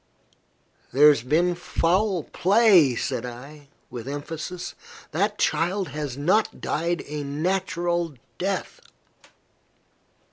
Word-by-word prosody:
"There 145 +4 +7
has 145 -6 +3
been 160 +8 +2
foul 175 +1 0
play," 190 - +4
said - - -2
I, 140 +4 -9 0.2
with 120 0 -7
emphasis. 160 +5 -5 0.4
"That 205 +6 0
child 180 +1 0
has 145 -2 -5
not 185 +10 +1
died 170 +2 -1
a 150 0 -5
natural 170 +1 -1 0.2
death." 195 - -2
165 Hz, 100 wpm, -24 LUFS, 145-185 Hz, 0.4 s, There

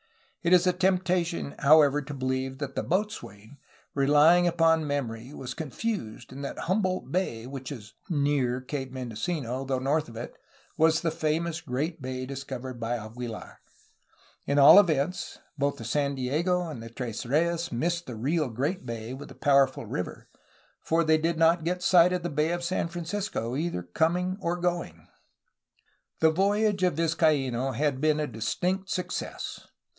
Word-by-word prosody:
It 170 - 0
is 180 0 +6
a 180 - +3
tempta 185 -1 +2
tion, 170 -4 -5
however, 145 0 +6
to 145 0 -7
believe 130 0 -2
that 140 -1 -5
the - - -1
boatswain, 145 - -3 0.3
relying 150 +5 +5
upon 165 -2 +3
memory, 125 -4 -3
was 125 -1 -6
confused 150 - -4
and 140 +2 -7
that 140 - -5
Humboldt 185 0 -1
Bay, 145 -11 -1
which 135 +1 -7
is 110 -6 -9 0.2
*'near^* 140 -5 0
Cape 135 -3 -4
Mendocino, 130 +1 -3
though 135 -1 -1
north 140 +2 0
of 115 - -12
it, 120 - -7 0.4
was 160 +1 +3
the 165 - 0
famous 165 +1 -1
great 155 +3 -3
bay 130 0 -4
discovered 130 -2 -6
by 120 +1 -1
Aguilar. 115 +1 -8 0.9
At 140 - +1
all 145 +7 +10
events, 160 -2 0 0.2
both 140 0 0
the 115 - -8
San 140 +4 0
Diego 170 +8 0
and 150 -8 -7
the 115 - -8
Tres 115 -2 -5
Reyes 170 +6 0
missed 170 +8 -1
the 125 - -6
real 145 +5 0
great 140 - -2
bay 115 -1 -5
with 140 +2 -9
the - - -12
powerful 140 -4 +3
river, 90 -4 -5 0.5
for 165 +1 +2
they 155 0 +3
did 165 +1 0
not 165 +1 +4
get 180 +2 -2
sight 180 -1 +6
of 180 -1 -1
the 175 - -1
Bay 150 +2 +1
of 175 0 -2
San 175 -1 -1
Francisco, 175 - -3
either 155 - -2
going 175 - 0
or 175 0 -1
coming. 175 - -3 1.1
The 160 0 +5
voyage 200 +3 +2
of 180 -4 +2
Vizcaino 140 -6 +1
had 145 -3 0
been 155 0 +3
a 150 - 0
distinct 180 - -2
success. 180 - -4
150 Hz, 165 wpm, -27 LUFS, 130-170 Hz, 1.1 s, all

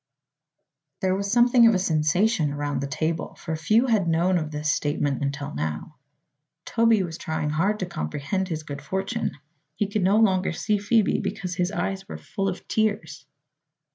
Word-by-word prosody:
There 185 -1 +2
was 200 +1 -2
something 240 0 +6
of 225 - +4
a - - +4
sensation 165 0 +2
around 145 -1 -2
the 140 - -2
table, 160 +3 -2
for 160 - -4
few 215 +10 +3
had 215 -8 +2
known 170 +2 +2
of 155 -2 -4
this 150 0 -1
statement 145 -2 -1
until 140 0 -3
now. 75 - -4 0.7
Toby 230 -3 +3
was 165 -2 -6
trying 160 -2 -2
hard 190 +8 +1
to - - 0
comprehend 175 - -3
his 160 -3 -4
good 145 -2 -7
fortune. 190 - -3 0.4
He 205 - 0
could 205 +1 -1
no 195 +3 +3
longer 190 -5 +3
see 210 +4 0
Phoebe 210 +1 +2
because 190 -3 -3
his 180 +1 -1
eyes 195 -2 -3
were - - -5
full 195 0 -3
of 180 - -7
tears. 215 -1 -1
180 Hz, 170 wpm, -25 LUFS, 155-205 Hz, 0.7 s, something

